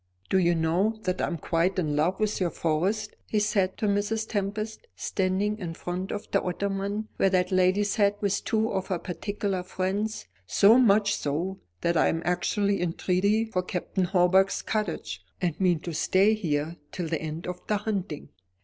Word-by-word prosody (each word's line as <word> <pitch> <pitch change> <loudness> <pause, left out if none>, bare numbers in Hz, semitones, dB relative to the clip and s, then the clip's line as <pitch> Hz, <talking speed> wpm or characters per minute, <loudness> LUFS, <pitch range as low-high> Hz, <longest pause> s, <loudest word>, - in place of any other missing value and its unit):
"Do 190 - +4
you 175 -1 +3
know 175 +7 +1
that 185 0 -1
I - - +1
am 170 - -3
quite 170 +4 0
in 155 -5 0
love 165 +6 +1
with 215 -1 0
your 180 - +2
Forest?" 185 +8 -1
he 215 - -1
said 200 -3 +1
to - - -1
Mrs. 210 +2 0
Tempest, 215 - -3
standing 200 +3 -1
in 170 -4 -5
front 180 +3 -4
of 205 - -5
the 195 - +3
ottoman 200 +3 -2
where 195 - +4
that 185 -1 +1
lady 185 +2 +3
sat 205 0 +1
with 205 -1 0
two 220 0 +1
of 190 -1 -2
her 185 - 0
particular 195 +2 -3
friends; 190 - -2 0.2
"so 215 - +6
much 205 -3 +4
so, 170 +6 -2 0.2
that 170 0 +1
I - - +4
am 165 +1 -1
actually 200 +3 +1
in 175 -2 0
treaty 200 +6 +1
for 195 -5 -1
Captain 180 +1 -2
Hawbuck's 185 +1 +3
cottage, 160 - -3 0.2
and 175 0 -2
mean 180 -3 +3
to 170 - -5
stay 190 +7 +3
here 160 -5 -1
till 175 -3 -3
the 160 -1 -2
end 160 +2 -5
of 180 0 -4
the 210 - +2
hunting." 200 -7 -4
190 Hz, 185 wpm, -27 LUFS, 175-205 Hz, 0.2 s, so